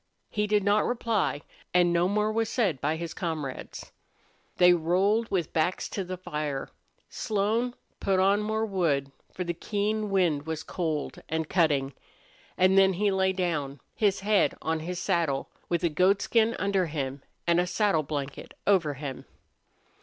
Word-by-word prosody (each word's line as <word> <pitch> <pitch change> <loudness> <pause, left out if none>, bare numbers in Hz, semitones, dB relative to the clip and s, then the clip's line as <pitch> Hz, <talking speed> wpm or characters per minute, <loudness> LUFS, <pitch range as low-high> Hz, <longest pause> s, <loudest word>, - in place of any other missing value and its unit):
He 210 0 0
did 210 -1 +2
not 205 +1 +3
reply, 230 -10 0 0.3
and 175 -1 +4
no 170 +1 +3
more 210 +2 +1
was 225 0 0
said 195 - 0
by 150 +2 +1
his 165 0 -5
comrades. 155 -7 -5 0.7
They 180 0 +7
rolled 190 +7 +2
with 175 -5 -1
backs 165 +3 0
to 195 - -3
the 185 0 -5
fire. 150 -5 -4 0.4
Slone 220 +4 -1 0.2
put 195 -1 +1
on 200 +2 +4
more 220 +1 -1
wood, 160 -9 0 0.2
for 185 - -4
the 175 -1 -2
keen 210 +4 -1
wind 170 -7 +1
was 160 0 -3
cold 160 -3 -3
and 160 -1 -1
cutting; 145 -6 +2 0.6
and 185 +1 +5
then 190 0 +5
he 200 +3 +1
lay 190 0 +2
down, 155 -7 -2
his 200 -3 +1
head 205 0 +2
on 160 0 -1
his 175 +3 -5
saddle, 170 -7 0 0.2
with 170 -1 0
a 170 - +3
goatskin 200 +7 +2
under 195 -3 +1
him 140 -3 -4 0.2
and 170 0 +3
a 180 - +1
saddle 200 -4 +2
blanket 140 -2 -5
over 170 -8 +3
him. 135 -1 -6
180 Hz, 160 wpm, -28 LUFS, 155-200 Hz, 0.7 s, They